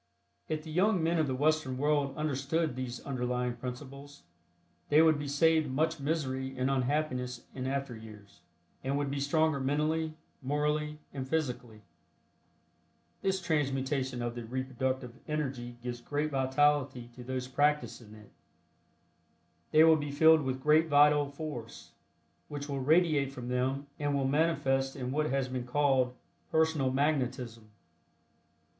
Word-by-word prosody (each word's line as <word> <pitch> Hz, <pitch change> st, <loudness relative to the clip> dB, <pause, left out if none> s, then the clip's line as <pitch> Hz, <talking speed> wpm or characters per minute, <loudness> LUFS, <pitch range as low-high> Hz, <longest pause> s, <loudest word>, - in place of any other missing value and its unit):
If 155 Hz, -1 st, -2 dB
the 160 Hz, -, -8 dB
young 185 Hz, +1 st, +2 dB
men 165 Hz, +1 st, +2 dB
of 155 Hz, -, +2 dB
the 130 Hz, -, -1 dB
Western 145 Hz, -2 st, +1 dB
world 145 Hz, 0 st, +1 dB
understood 150 Hz, 0 st, -1 dB
these 130 Hz, -1 st, -5 dB
underlying 125 Hz, -2 st, -2 dB
principles 140 Hz, +2 st, -8 dB, 0.7 s
they 150 Hz, -, +5 dB
would 160 Hz, -2 st, +5 dB
be 145 Hz, -, -4 dB
saved 155 Hz, +1 st, +3 dB
much 160 Hz, +4 st, 0 dB
misery 135 Hz, -3 st, -2 dB
and 130 Hz, +2 st, +1 dB
unhappiness 125 Hz, -2 st, -1 dB
in 130 Hz, -1 st, -4 dB
after 135 Hz, -2 st, -2 dB
years, 105 Hz, -3 st, -13 dB, 0.4 s
and 135 Hz, +2 st, 0 dB
would 145 Hz, -1 st, -1 dB
be 140 Hz, -, -2 dB
stronger 155 Hz, +1 st, +2 dB
mentally, 155 Hz, +3 st, 0 dB, 0.3 s
morally 150 Hz, +2 st, -1 dB, 0.2 s
and 130 Hz, -2 st, -5 dB
physically. 125 Hz, -8 st, -3 dB, 1.4 s
This 190 Hz, 0 st, +1 dB
transmutation 135 Hz, -6 st, -1 dB
of 120 Hz, 0 st, -2 dB
the 120 Hz, 0 st, -6 dB
reproductive 130 Hz, +1 st, -3 dB
energy 130 Hz, -5 st, -3 dB
gives 120 Hz, -1 st, -5 dB
great 145 Hz, +4 st, -2 dB
vitality 130 Hz, -2 st, +1 dB
to 125 Hz, -, -10 dB
those 130 Hz, 0 st, -4 dB
practicing 145 Hz, -5 st, 0 dB
it. 105 Hz, -1 st, -16 dB, 1.4 s
They 155 Hz, +1 st, +6 dB
will 160 Hz, -1 st, +7 dB
be 145 Hz, -1 st, -4 dB
filled 160 Hz, +2 st, +6 dB
with 130 Hz, -1 st, -3 dB
great 155 Hz, +2 st, +5 dB
vital 145 Hz, -1 st, +5 dB
force, 140 Hz, -6 st, -7 dB, 0.6 s
which 145 Hz, -1 st, -6 dB
will 140 Hz, -2 st, -3 dB
radiate 150 Hz, -1 st, +3 dB
from 125 Hz, -2 st, -7 dB
them 130 Hz, +3 st, -1 dB
and 145 Hz, -1 st, 0 dB
will 135 Hz, -1 st, +1 dB
manifest 135 Hz, -3 st, +1 dB
in 130 Hz, -2 st, -4 dB
what 155 Hz, +2 st, 0 dB
has 135 Hz, -1 st, 0 dB
been 125 Hz, -1 st, -4 dB
called 130 Hz, -2 st, +2 dB, 0.3 s
"personal 160 Hz, -4 st, +2 dB
magnetism." 125 Hz, -5 st, -1 dB
140 Hz, 140 wpm, -31 LUFS, 130-150 Hz, 1.4 s, will